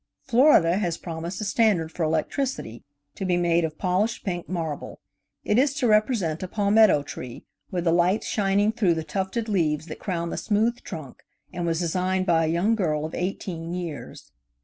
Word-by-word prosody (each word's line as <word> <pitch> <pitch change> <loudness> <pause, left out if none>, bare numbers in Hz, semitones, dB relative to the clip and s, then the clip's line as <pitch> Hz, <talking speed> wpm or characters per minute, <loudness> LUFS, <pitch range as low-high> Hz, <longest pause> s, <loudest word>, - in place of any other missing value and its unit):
Florida 230 - +4
has 175 -5 -1
promised 170 +2 -6
a - - -2
standard 195 -7 +2
for 170 - -7
electricity, 160 - -2 0.3
to - - -6
be 180 -2 +1
made 170 -1 +2
of 155 -1 -3
polished 195 +5 0
pink 175 -3 -3
marble. 165 -5 -4 0.5
It 210 - +3
is 280 +1 +2
to 285 -3 0
represent 215 -7 +2
a 185 - -3
palmetto 205 -5 +4
tree, 125 -3 -8 0.2
with 180 -3 -2
the 165 - +2
lights 175 +5 +2
shining 205 0 +2
through 195 -7 +2
the 160 - -3
tufted 190 +8 -3
leaves 155 -7 0
that 155 - -8
crown 170 -3 -3
the - - -4
smooth 225 +3 +1
trunk, 155 -8 -9 0.3
and 175 -1 -3
was 165 +1 0
designed 185 +2 0
by 165 -2 +3
a - - -1
young 175 +7 +2
girl 155 -8 0
of 160 - -7
eighteen 175 -2 -4
years. 165 -9 -7
180 Hz, 180 wpm, -25 LUFS, 165-205 Hz, 0.5 s, Florida